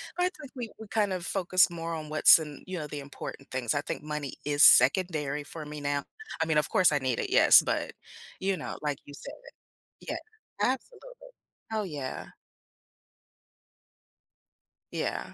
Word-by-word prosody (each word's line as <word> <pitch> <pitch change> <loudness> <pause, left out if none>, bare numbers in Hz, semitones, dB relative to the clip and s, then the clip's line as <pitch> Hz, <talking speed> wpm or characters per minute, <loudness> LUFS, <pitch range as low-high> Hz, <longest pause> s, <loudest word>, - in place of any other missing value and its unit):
but 360 - 0
I - - +2
think 305 -7 -13
we 240 -3 -5
we 220 - -9
kind 205 -2 0
of 180 -1 -4
focus 185 -1 +3
more 165 -1 -5
on 155 -1 -6
what's 155 +1 +7
in, 150 -2 -8
you 185 -2 -5
know, 150 - -5
the 145 0 -6
important 140 0 -9
things, 130 -3 -1
I 145 - +1
think - - -5
money 150 -2 -4
is 145 0 +3
secondary 150 +1 +5
for 155 +1 -9
me 150 0 -7
now. 145 0 -1 0.4
I - - +3
mean, 160 -1 +1
of 150 - +2
course, 180 -4 +4
I 145 - +2
need 130 -3 -1
it, - - -2
yes, - - +7
but, - - -1 0.5
you 190 -1 0
know, - - -6
like 145 -2 -2
you 145 - -12
said 280 - -9 0.7
yeah, - - -4 0.4
absolutely. 460 - -2 0.6
Oh 215 -1 -1
yeah. 145 -7 -5 2.7
Yeah. - - -3
155 Hz, 170 wpm, -28 LUFS, 145-190 Hz, 2.7 s, what's